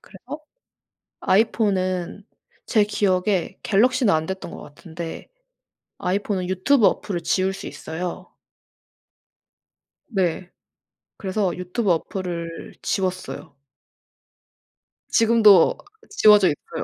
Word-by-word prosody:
그래서 270 +11 -10 0.8
아이폰은 195 -3 0 0.4
제 215 -3 +3
기억에 190 -2 0
갤럭시는 240 - +3
안 155 0 0
됐던 190 0 -6
것 - - -9
같은데 160 +2 -9 0.7
아이폰은 185 0 -2
유튜브 205 +6 +3
어플을 175 -5 -1
지울 190 +3 +1
수 195 - -8
있어요. 175 +2 -6 1.8
네. 185 -4 -1 0.7
그래서 190 -1 -2
유튜브 180 +3 -2
어플을 170 -1 -5
지웠어요. 185 -6 -3 1.5
지금도 220 -5 +5 0.3
지워져 210 - +5
있고요. 145 - -5
190 Hz, 215 characters per minute, -22 LUFS, 180-210 Hz, 1.8 s, 지금도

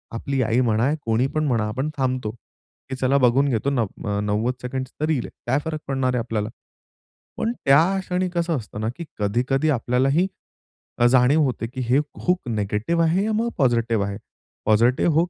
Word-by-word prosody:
आपली 135 +3 -1
आई 115 +1 +1
म्हणा, 115 +1 +2 0.2
कोणी 115 +3 +2
पण 155 +2 -1
म्हणा, 115 -5 +1
आपण 130 +7 -2
थांबतो, 130 -5 -1 0.6
की 135 - -3
चला 130 +2 +2
बघून 135 +2 +3
घेतो, 125 +2 0
नव्व 115 -6 -2
अ, 100 0 0
90 105 +4 0
सेकंड्सची 130 +3 -4
रील 150 -7 0
आहे, - - -9 0.2
काय 130 +4 +2
फरक 160 -1 -3
पडणार 135 -2 0
आहे - - +1
आपल्याला? 115 -2 -2 0.9
पण 225 - 0
त्या 160 +8 +5
क्षणी 185 0 -1
कसं 170 -2 0
असतं 105 -2 -7
ना, 110 - -1
की 170 - -6
कधी-कधी 125 +8 +1
आपल्यालाही 135 +6 +2 0.7
अ, 120 - +5
जाणीव 130 +5 +4
होते, 125 -4 -1
की 130 +2 -6
हे 130 +3 +5 0.3
हूक 180 -8 +1
निगेटिव्ह 110 +9 0
आहे 170 +4 +2
या 220 - 0
मग 230 +2 0
पॉझिटिव्ह 115 -5 +2
आहे. 100 0 -4 0.5
Positive 120 +9 +3
hook 170 +2 +3
130 Hz, 180 wpm, -23 LUFS, 115-150 Hz, 0.9 s, त्या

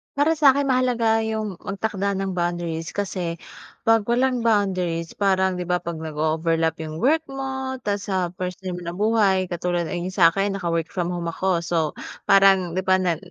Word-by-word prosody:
Para 290 +3 +3
sa'kin 285 -2 +5
mahalaga 240 -3 +2
'yung 215 -4 -3
magtakda 200 0 -2
ng 195 0 -2
boundaries 170 -2 -2
kasi 180 -4 -2 0.5
'pag 225 -2 +4
walang 250 +1 +2
boundaries 185 -7 0
parang 190 -2 +2
'di 180 - -3
ba, 180 0 +1
'pag 170 -1 -5
nag-o-overlap 160 +1 0
'yung 155 -1 -5
work 310 +5 +3
mo 265 -1 -4
tas 200 -1 -2
sa 185 -3 -1
personal 180 0 -5
na 170 0 -5
buhay 200 -3 +2
katulad 175 0 -1
ng 175 -1 -3
sa 170 -4 +6
akin 195 +2 -1
naka-work 170 -3 -1
from 175 -1 -1
home 175 -1 -3
ako, 185 +1 0
so 170 0 -2 0.5
parang 195 -2 +5
'di 185 - 0
ba, 185 - +5
na 175 -3 +1
190 Hz, 165 wpm, -23 LUFS, 170-220 Hz, 0.5 s, sa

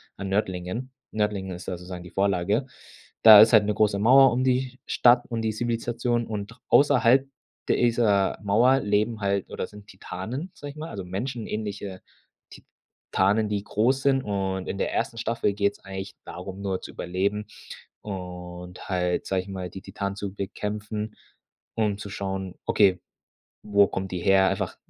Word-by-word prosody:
an 95 - -5
Nördlingen. 95 +5 -2 0.2
Nördlingen 105 -3 -1
ist 90 - -10
da 90 - -3
sozusagen 90 0 -8
die - - -10
Vorlage. 100 +5 +1 0.5
Da 110 -2 +11
ist 110 - +7
halt 110 -3 +6
'ne 105 - +1
große 105 -1 +2
Mauer 130 +5 +7
um 125 +2 0
die 130 0 0
Stadt 120 0 +4
und 115 -1 -3
die 110 -1 0
Zivilisation 120 +1 -1
und 105 +2 -6
außerhalb 135 -2 +5 0.4
dieser 115 -5 +2
Mauer 120 +7 +4
leben 105 +1 0
halt 100 -1 -1
oder - - -4
sind 105 -1 -14
Titanen, 110 - -6
sage 145 0 -8
ich - - -17
mal, 160 +2 -6
also 100 - -6
menschenähnliche 105 -1 -5 1.1
Titanen, 105 +3 +3
die 100 -1 -1
groß 125 +6 +1
sind. 135 -1 +3
Und 95 -2 -2
in - - -3
der - - -1
ersten 115 - -1
Staffel 115 -3 0
geht's 100 0 0
eigentlich 95 +1 -7
darum, 95 +2 -8
nur 95 -2 -2
zu - - -9
überleben 100 +4 -2 0.6
und 90 -2 -8
halt, 90 -1 0
sage 95 -1 0
ich - - -16
mal, 95 -2 -5
die 95 +2 -9
Titanen 100 0 -4
zu 100 -1 -5
bekämpfen, 105 +2 -4 0.6
um 105 -3 0
zu 100 0 -8
schauen, 95 -2 -4
okay, 95 -3 +3 0.6
wo 100 -1 +4
kommt 95 0 -4
die 90 - -2
her? 95 +1 +4
Einfach - - -2
105 Hz, 160 wpm, -25 LUFS, 95-115 Hz, 1.1 s, Da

